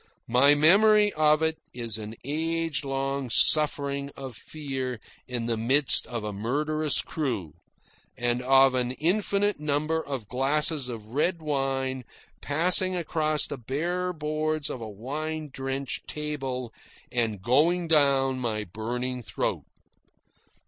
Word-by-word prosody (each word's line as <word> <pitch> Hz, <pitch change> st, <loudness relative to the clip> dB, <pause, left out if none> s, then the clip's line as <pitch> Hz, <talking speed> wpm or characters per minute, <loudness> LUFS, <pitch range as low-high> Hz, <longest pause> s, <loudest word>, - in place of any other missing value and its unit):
My 140 Hz, +5 st, +5 dB
memory 210 Hz, +7 st, +5 dB
of 155 Hz, 0 st, +3 dB
it 160 Hz, 0 st, 0 dB, 0.2 s
is 115 Hz, -3 st, -1 dB
of 110 Hz, -, -5 dB
an 110 Hz, +2 st, -8 dB
age 165 Hz, +2 st, -1 dB
long 135 Hz, -1 st, -2 dB
suffering 140 Hz, +1 st, +3 dB
of 130 Hz, -3 st, -7 dB
fear 135 Hz, -3 st, -5 dB, 0.3 s
in 120 Hz, -2 st, -3 dB
the 115 Hz, -1 st, -1 dB
midst 130 Hz, +5 st, +2 dB
of 120 Hz, -3 st, -5 dB
a 105 Hz, -1 st, -4 dB
murderous 150 Hz, +8 st, +1 dB
crew, 120 Hz, -, -3 dB, 0.6 s
and 120 Hz, 0 st, 0 dB
of 135 Hz, +1 st, +5 dB
an 125 Hz, -1 st, -1 dB
infinite 200 Hz, +5 st, 0 dB
number 155 Hz, +2 st, -1 dB
of 130 Hz, -7 st, -5 dB
glasses 140 Hz, +2 st, +2 dB
of 115 Hz, -3 st, -7 dB
red 150 Hz, +10 st, 0 dB
wine 135 Hz, -3 st, -2 dB, 0.4 s
passing 180 Hz, +5 st, +2 dB
across 155 Hz, -3 st, 0 dB
the 145 Hz, -, -6 dB
bare 175 Hz, +9 st, -2 dB
boards 155 Hz, -1 st, -2 dB
of 125 Hz, -, -6 dB
a 110 Hz, -, -6 dB
wine 150 Hz, +8 st, -5 dB
drenched 135 Hz, 0 st, -4 dB
table 135 Hz, -5 st, -4 dB, 0.4 s
and 110 Hz, -5 st, -1 dB
going 165 Hz, -, +2 dB
down 135 Hz, -4 st, +3 dB
my 110 Hz, -4 st, -2 dB
burning 120 Hz, +6 st, -4 dB
throat. 115 Hz, -, -3 dB
140 Hz, 130 wpm, -26 LUFS, 125-155 Hz, 0.6 s, My